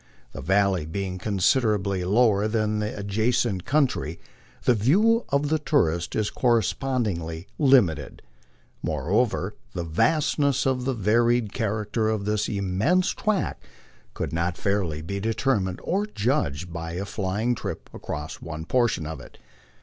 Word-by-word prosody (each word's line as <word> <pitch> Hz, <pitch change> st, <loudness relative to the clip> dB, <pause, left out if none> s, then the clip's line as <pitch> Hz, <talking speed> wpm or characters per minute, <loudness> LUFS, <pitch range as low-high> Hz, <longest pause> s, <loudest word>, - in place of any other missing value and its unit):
The -, -, -7 dB
valley 95 Hz, 0 st, +2 dB
being 95 Hz, +2 st, -4 dB
considerably 100 Hz, -1 st, +1 dB
lower 105 Hz, +1 st, +3 dB
than 110 Hz, -1 st, 0 dB
the 105 Hz, +4 st, -3 dB
adjacent 105 Hz, -1 st, 0 dB
country, 130 Hz, -, 0 dB, 0.4 s
the 125 Hz, -, +4 dB
view 205 Hz, -, +3 dB
of 140 Hz, +1 st, +1 dB
the 155 Hz, 0 st, +2 dB
tourist 85 Hz, -, +1 dB
is 110 Hz, -1 st, 0 dB
correspondingly 110 Hz, -8 st, 0 dB
lim 135 Hz, -6 st, +6 dB
ited. 80 Hz, -4 st, -7 dB, 0.6 s
Moreover, -, -, 0 dB, 0.2 s
the 85 Hz, -, -3 dB
vastness 140 Hz, -, +1 dB
and 130 Hz, -1 st, +1 dB
varied 120 Hz, -2 st, +1 dB
character 110 Hz, 0 st, -1 dB
of 110 Hz, -2 st, -1 dB
this 105 Hz, 0 st, 0 dB
immense 100 Hz, -, +1 dB
tract 215 Hz, -3 st, -1 dB, 0.5 s
could -, -, -3 dB
not 85 Hz, +1 st, -1 dB
fairly 90 Hz, -6 st, -1 dB
be 100 Hz, +4 st, -4 dB
determined 110 Hz, -3 st, 0 dB
or 200 Hz, +3 st, 0 dB
judged 105 Hz, -, 0 dB
of -, -, -11 dB
by 85 Hz, 0 st, -5 dB
a 95 Hz, +3 st, -3 dB
flying 105 Hz, +4 st, -1 dB
trip -, -, -5 dB
across 75 Hz, 0 st, -6 dB
one 80 Hz, -1 st, -6 dB
portion 115 Hz, -7 st, +1 dB
of 80 Hz, +1 st, -6 dB
it. -, -, -14 dB
105 Hz, 135 wpm, -25 LUFS, 90-125 Hz, 0.6 s, lim